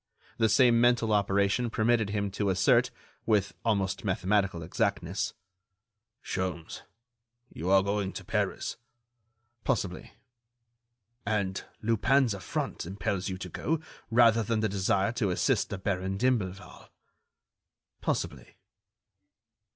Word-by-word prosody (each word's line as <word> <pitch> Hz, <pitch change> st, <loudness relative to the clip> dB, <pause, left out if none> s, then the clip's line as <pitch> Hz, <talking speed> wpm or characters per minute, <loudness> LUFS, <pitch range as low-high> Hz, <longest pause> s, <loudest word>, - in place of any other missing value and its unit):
The 110 Hz, -, +4 dB
same 120 Hz, 0 st, +5 dB
mental 120 Hz, -2 st, +3 dB
operation 100 Hz, +3 st, +2 dB
permitted 110 Hz, -1 st, +2 dB
him 100 Hz, -1 st, -1 dB
to 100 Hz, 0 st, -1 dB
assert, 120 Hz, +7 st, +4 dB, 0.4 s
with 105 Hz, -3 st, +2 dB
almost 100 Hz, -4 st, 0 dB
mathematical 95 Hz, -2 st, 0 dB
exactness: 80 Hz, -, -1 dB, 0.9 s
"Sholmes, 90 Hz, -3 st, -4 dB, 0.7 s
you 85 Hz, +5 st, -4 dB
are 95 Hz, 0 st, +5 dB
going 100 Hz, -1 st, -1 dB
to -, -, -7 dB
Paris." -, -, -2 dB, 0.9 s
"Possibly." 100 Hz, -8 st, -2 dB, 1.1 s
"And 100 Hz, -2 st, -1 dB, 0.2 s
Lupin's 115 Hz, +3 st, +3 dB
affront 100 Hz, -, -4 dB
impels 95 Hz, 0 st, -2 dB
you 95 Hz, -, -4 dB
to 90 Hz, 0 st, -7 dB
go, 160 Hz, -, -1 dB, 0.3 s
rather 115 Hz, -1 st, +5 dB
than 110 Hz, 0 st, 0 dB
the 110 Hz, -, +2 dB
desire 95 Hz, +1 st, +1 dB
to 120 Hz, -4 st, -1 dB
assist 90 Hz, -, +1 dB
the 100 Hz, -, -4 dB
Baron 95 Hz, 0 st, -2 dB
d'Imblevalle." 100 Hz, -6 st, -2 dB, 1.1 s
"Possibly." -, -, -3 dB
100 Hz, 110 wpm, -29 LUFS, 95-115 Hz, 1.1 s, same